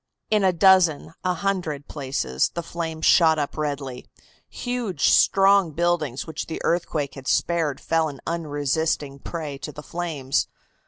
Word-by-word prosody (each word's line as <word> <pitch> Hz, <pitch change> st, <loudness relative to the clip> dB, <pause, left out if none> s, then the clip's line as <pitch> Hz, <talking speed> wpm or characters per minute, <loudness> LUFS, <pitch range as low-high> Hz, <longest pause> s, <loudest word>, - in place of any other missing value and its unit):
In 210 Hz, -2 st, +3 dB
a 190 Hz, -, +5 dB
dozen, 180 Hz, -4 st, +4 dB
a 180 Hz, -1 st, +1 dB
hundred, 170 Hz, -6 st, -2 dB
places 130 Hz, -, -1 dB
the 170 Hz, -, -3 dB
flames 165 Hz, -1 st, -4 dB
shot 160 Hz, -3 st, +5 dB
up 145 Hz, -2 st, -2 dB
redly. 140 Hz, -4 st, -4 dB, 0.4 s
Huge, 240 Hz, -, -1 dB
strong 195 Hz, -4 st, +4 dB
buildings 165 Hz, -6 st, 0 dB
which 160 Hz, -1 st, -5 dB
the 160 Hz, -, -5 dB
earthquake 160 Hz, -4 st, -1 dB
had 135 Hz, -2 st, -10 dB
spared 165 Hz, -5 st, +1 dB
fell 165 Hz, -1 st, +1 dB
an 140 Hz, -2 st, -10 dB
unresisting 145 Hz, -2 st, -1 dB
prey 150 Hz, -3 st, -6 dB
to 150 Hz, -, -6 dB
the 150 Hz, +1 st, -10 dB
flames. 155 Hz, -7 st, -2 dB
160 Hz, 145 wpm, -24 LUFS, 145-175 Hz, 0.4 s, a